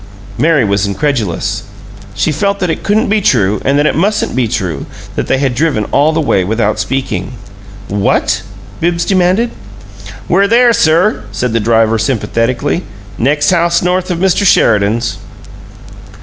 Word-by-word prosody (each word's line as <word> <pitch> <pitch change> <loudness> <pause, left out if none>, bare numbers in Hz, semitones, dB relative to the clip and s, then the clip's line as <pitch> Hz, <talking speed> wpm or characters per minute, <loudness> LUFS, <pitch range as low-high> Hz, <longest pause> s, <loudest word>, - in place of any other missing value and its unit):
Mary 155 -6 +2
was 100 0 0
incredulous; 110 - -2 0.5
she 160 - 0
felt 200 +6 -1
that 180 -4 0
it - - -4
couldn't 215 +2 +1
be 210 +1 +1
true 105 - +1
and 140 +1 +1
that 145 - +2
it - - +2
mustn't 205 +6 0
be 125 -2 +1
true 95 - -3 0.3
that - - -2
they 135 - +1
had 135 -2 0
driven 140 -5 0
all 145 +3 +3
the 160 - -1
way 120 -11 +1
without 110 +2 -1
speaking. 110 -3 -3 0.5
"What?" 100 -1 0 0.4
Bibbs 170 0 0
demanded. 190 +5 +1 0.8
"We're 195 +3 +3
there, 235 +2 +4
sir," 160 - +2
said 120 +3 -2
the 115 - +1
driver, 115 0 +2
sympathetically. 120 - -1 0.4
"Next 145 +7 +2
house 170 -1 +2
north 180 +1 0
of 175 - -1
Mr. 190 +3 +1
Sheridan's." 115 - +2
140 Hz, 150 wpm, -13 LUFS, 110-175 Hz, 0.8 s, there